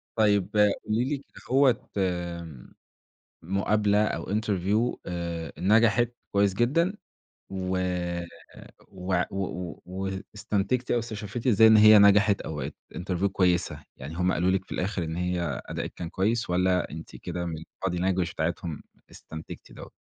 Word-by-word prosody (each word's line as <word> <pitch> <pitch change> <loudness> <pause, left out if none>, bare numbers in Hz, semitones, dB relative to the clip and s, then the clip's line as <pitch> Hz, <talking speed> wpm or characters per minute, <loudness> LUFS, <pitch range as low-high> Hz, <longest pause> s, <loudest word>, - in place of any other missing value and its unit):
طيب، 105 -3 +3 0.4
قولي 110 +3 +1
ليِ 145 +1 -1
كدهوّة 135 -2 0
آمم 85 -6 -3 0.7
مقابلة 105 +3 +2
أو - - -3
interview 105 +2 0
آآ 85 -3 -4
نَجَحت 115 +3 +4 0.2
كويس 100 -1 +3
جدًا 150 - +2 0.6
و 95 -1 -2 1.1
وع 90 -1 -1
و 95 0 -1
و 90 -3 -6
واستنتجتِ 95 +5 -2
أو 120 - +3
استشفّيتِ 110 +1 -5
إزاي 110 -1 +7
إن 110 -1 +7
هي 110 0 +9
نَجَحَت 100 0 +5
أو 80 - -5
بَقِت 75 - -5 0.2
interview 90 +1 -2
كويسة؟ 90 -2 +1
يعني 70 +5 -8
هم 90 +1 +1
قالوا 90 +2 +2
لِك 95 0 0
في - - -20
الآخِر 95 -1 -2
إن 80 0 -4
هي 90 -4 -2
أداءكِ - - -5
كان 85 -2 -6
كويس 110 +5 0
والّا 90 0 +2
أنتِ 80 +1 -9
كده 90 0 -5
من 80 -2 -4
الbody 90 +3 -5
language 90 -1 0
بتاعتهم 85 -1 -3 0.3
استنتجتِ 80 0 -10
دوّة؟ - - -11
95 Hz, 140 wpm, -27 LUFS, 90-105 Hz, 1.1 s, هي